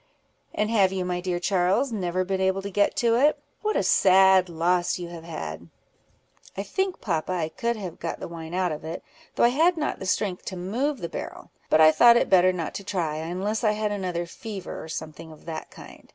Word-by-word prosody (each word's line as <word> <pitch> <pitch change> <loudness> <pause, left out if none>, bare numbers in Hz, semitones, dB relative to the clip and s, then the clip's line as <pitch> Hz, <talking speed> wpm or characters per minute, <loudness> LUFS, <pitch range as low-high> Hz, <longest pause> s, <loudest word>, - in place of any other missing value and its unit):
"And 215 +1 0
have 195 -4 +4
you, 190 -1 -2
my 180 0 -2
dear 180 -1 -2
Charles, 190 +8 +1
never 185 -4 -1
been 190 0 -1
able 190 +1 +1
to 200 - -5
get 205 +1 +2
to 235 -1 +2
it? 290 +4 +4 0.2
what 430 0 -1
a - - +2
sad 190 -1 +5
loss 175 +1 +1
you 175 -1 -6
have 170 -1 -9
had!" 85 - -7 0.9
"I 195 - -2
think, 380 - -2
papa, 170 -2 -1
I 165 -3 -1
could 235 +6 -2
have 190 -6 -7
got 165 - -4
the - - -6
wine 165 0 -7
out 185 -2 +1
of 150 0 -6
it, 160 +2 -6 0.3
though - - +2
I 235 - +7
had 330 +7 +3
not 300 -9 -2
strength 185 0 -1
to 185 - -5
move 245 +10 -2
the 170 - -3
barrel; - - -8 0.2
but 155 - +4
I 155 0 +8
thought 235 +7 +7
it - - 0
better 185 -1 +6
not 170 -4 -4
to - - -13
try, 170 -6 -2
unless 185 +8 -3
I 215 -2 +3
had 210 0 -1
another 180 -4 -2
fever, 195 +2 -7
or 160 - -10
something 160 0 -7
of 155 - -15
that 165 -1 -6
kind. - - -14
185 Hz, 220 wpm, -25 LUFS, 170-210 Hz, 0.9 s, I